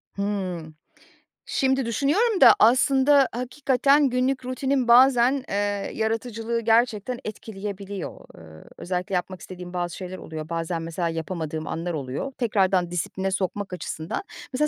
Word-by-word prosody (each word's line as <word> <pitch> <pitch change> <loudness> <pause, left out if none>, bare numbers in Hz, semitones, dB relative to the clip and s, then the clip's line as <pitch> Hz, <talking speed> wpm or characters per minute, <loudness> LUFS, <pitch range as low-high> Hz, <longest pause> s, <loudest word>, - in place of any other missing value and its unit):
Hımm. 185 -6 -3 0.7
Şimdi 265 -1 +1
düşünüyorum 345 - +1
da - - +10
aslında, 265 +4 +5
hakikaten, 270 +3 +2
günlük 255 +1 0
rutinin 255 0 0
bazen, 255 +2 +5
eee, - - -2 0.4
yaratıcılığı 225 +1 -2
gerçekten 230 +1 +1
etkileyebiliyor. 200 -2 -6 0.2
Iıı, 80 -1 -14
özellikle 180 +1 -3
yapmak 180 0 -3
istediğim 180 -1 -9
bazı 175 -2 -3
şeyler 185 0 -7
oluyor. 155 0 -7
Bazen 165 0 -2
mesela, 165 +1 -2
yapamadığım 160 -1 -4
anlar 170 +2 -3
oluyor. 140 - -4
Tekrardan 190 -6 +1
disipline 190 +3 -2
sokmak 195 0 -2
açısından, 165 - -4 0.3
mesela, 300 +4 +2
205 Hz, 125 wpm, -24 LUFS, 175-255 Hz, 0.7 s, da